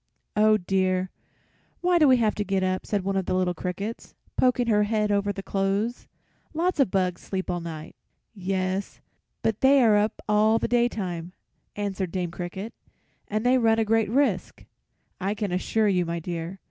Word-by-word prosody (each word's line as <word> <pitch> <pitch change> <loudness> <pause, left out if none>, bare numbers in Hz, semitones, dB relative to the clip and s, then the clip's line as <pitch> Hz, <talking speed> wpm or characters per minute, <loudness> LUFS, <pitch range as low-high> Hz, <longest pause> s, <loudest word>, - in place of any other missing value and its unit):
"Oh 215 0 +5
dear! 185 -1 0 0.7
why 355 -1 +3
do 305 - +6
we 260 -1 +6
have 220 -3 +2
to 205 - -2
get 195 -2 0
up?" 185 0 -1
said 205 -3 -1
one 195 +1 -1
little 185 0 0
cricket, 195 +6 -5 0.2
poking 250 -1 +2
his 210 -2 +2
head 210 -1 +1
over 205 0 +1
the 195 -1 -6
clothes. 200 +5 -1 0.5
"Lots 345 +1 0
of 270 - +4
bugs 185 -2 0
sleep 190 -1 -3
all 175 - -2
night." 160 -1 -8 0.4
"Yes, 190 -1 -2 0.4
but 220 -2 0
they 275 +1 +6
are 215 -3 +5
up 210 +1 0
all 215 +1 +4
the - - -1
daytime," 190 -8 -1 0.4
answered 195 -3 -3
Dame 180 -2 -2
Cricket, 190 +6 -6 0.5
"and 215 +2 -2
they 255 +1 +4
run 225 -1 +3
a 225 - +2
great 220 -1 +2
risk, 275 +5 0 0.5
I 195 +3 -1
can 210 -3 -3
assure 210 +4 +1
you, 185 -3 +2
my 170 0 -3
dear. 170 +2 -5
200 Hz, 170 wpm, -26 LUFS, 185-225 Hz, 0.7 s, do